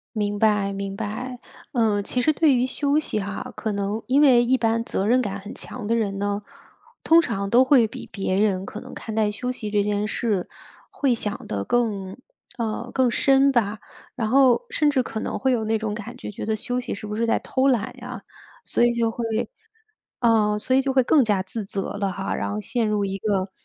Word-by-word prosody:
明 205 -1 -1
白 205 -2 +2
明 195 0 -4
白。 245 +5 -5 0.3
呃， 220 -5 +2
其 250 +5 -1
实 310 +5 +3
对 300 -2 +4
于 245 0 +2
休 285 +3 +1
息 300 -8 -1
哈， 200 +5 -5
可 220 - -3
能 200 +2 -2
因 270 +3 +4
为 255 -5 +6
一 255 +2 +3
般 230 -1 +1
责 195 - -2
任 250 +3 +4
感 200 -4 -3
很 200 +1 -9
强 250 -4 -8
的 230 +2 +1
人 205 -4 -1
呢， 205 +1 -1 0.6
通 330 +1 +6
常 200 -10 -3
都 245 +4 +6
会 260 -4 +5
比 - - -9
别 195 -2 -1
人 195 -2 +1
可 215 - -7
能 - - -11
看 220 - -7
待 215 -1 +2
休 250 +4 -3
息 225 -4 -5
这 205 -1 +2
件 205 0 0
事， 210 -4 -1 0.4
会 275 -3 +1
想 210 -3 -4
得 100 -1 -2
更 200 - -1 0.4
呃， 235 +1 -3
更 260 -2 +2
深 275 +2 +4
吧。 220 -4 0 0.4
然 230 -4 -1
后 265 - +4
甚 305 -12 +2
至 270 -3 +2
可 220 - -5
能 - - -3
会 265 - +1
有 235 -3 +1
那 220 +1 +1
种 215 -1 -3
感 230 +3 -7
觉， 250 - -7
觉 - - -6
得 220 - 0
休 245 +3 -2
息 250 - -4
是 200 - -8
不 210 0 -4
是 230 +2 0
在 - - +3
偷 260 +1 0
懒 245 -5 +1
呀。 245 -3 -8 0.4
所 - - +2
以 240 - +5
就 230 -1 +1
会 235 +1 -4 1.0
呃， 220 -3 +3
所 255 +4 +1
以 265 - +5
就 270 0 -1
会 260 - +5
更 280 +3 +4
加 205 -4 +1
自 215 +3 -5
责 195 0 -4
了 200 -2 0
哈。 195 +2 -3
然 - - -2
后 210 - -2
陷 230 +1 -1
入 210 -1 +1
一 195 0 -3
个， 195 -2 -1
220 Hz, 240 characters per minute, -24 LUFS, 205-250 Hz, 1.0 s, 为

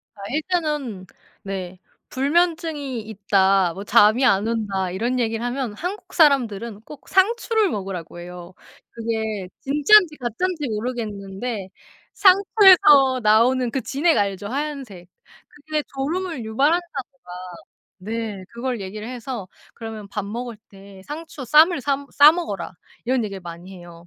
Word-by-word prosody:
아 205 - -15
일단은 300 - -2 0.4
네. 190 -2 -6 0.3
"불면증이 295 -2 0
있다. 195 -3 +2
뭐 195 - -7
잠이 215 +5 +4
안 200 -3 +3
온다." 205 -5 -2
이런 235 +7 -1
얘기를 225 -1 -1
하면 245 -2 -3
한국 360 - -6
사람들은 235 - +2
꼭 285 +4 -13
상추를 440 +1 +2
먹으라고 190 - -6
해요. 175 0 -10 0.4
그게 220 -4 -3
진짠지 300 +5 +4
가짠지 295 +6 -2
모르겠는데 215 -2 -4 0.4
상추에서 370 - +6
나오는 235 +4 +3
그 265 - -2
진액 305 +6 +1
알죠? 200 0 -2
하얀색. 265 -9 -5 0.4
그게 305 +1 -4
졸음을 320 0 -3
유발한다고 300 +11 +1
막 270 0 -6 0.8
네 215 -1 -5
그걸 240 +1 -4
얘기를 210 +4 -7
해서 245 -5 -6 0.2
"그러면 220 -2 -8
밥 200 0 -4
먹을 235 +1 -6
때 195 -1 -15
상추 300 -3 -8
쌈을 310 +5 +5
삼 280 +1 -2
싸 290 +2 +8
먹어라." 310 - -4 0.3
이런 250 -1 +1
얘기를 200 -2 -6
많이 175 +2 -10
해요. 175 -1 -13
235 Hz, 280 characters per minute, -22 LUFS, 200-295 Hz, 0.8 s, 싸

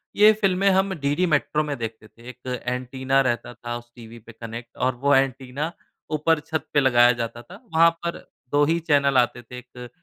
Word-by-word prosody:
ये 210 +1 +7
फ़िल्में 195 0 +3
हम 190 0 +2
डीडी 145 +6 +1
मैट्रो 150 +1 +1
में 150 -1 -3
देखते 110 -1 -6
थे। 115 +3 -14
1 125 0 -6
एन्टीना 130 +2 -1
रहता 120 0 -2
था 120 0 -6
उस 120 0 -15
टीवी 115 -1 -12
पे 115 +1 -14
कनैक्ट 115 +1 -9
और 130 - +1
वो 140 0 +4
एन्टीना 135 +3 -1 0.5
ऊपर 160 +1 +2
छत 160 -3 -2
पे 145 - +4
लगाया 120 -2 +5
जाता 115 +1 -5
था। 190 - -14
वहाँ 165 +1 +6 0.2
पर 170 - -2 0.3
2 145 0 +3
ही 165 +3 +1
चैनल 140 -2 +3
आते 120 0 +2
थे 125 +2 -11
एक 125 0 -11
130 Hz, 200 wpm, -23 LUFS, 120-150 Hz, 0.5 s, ये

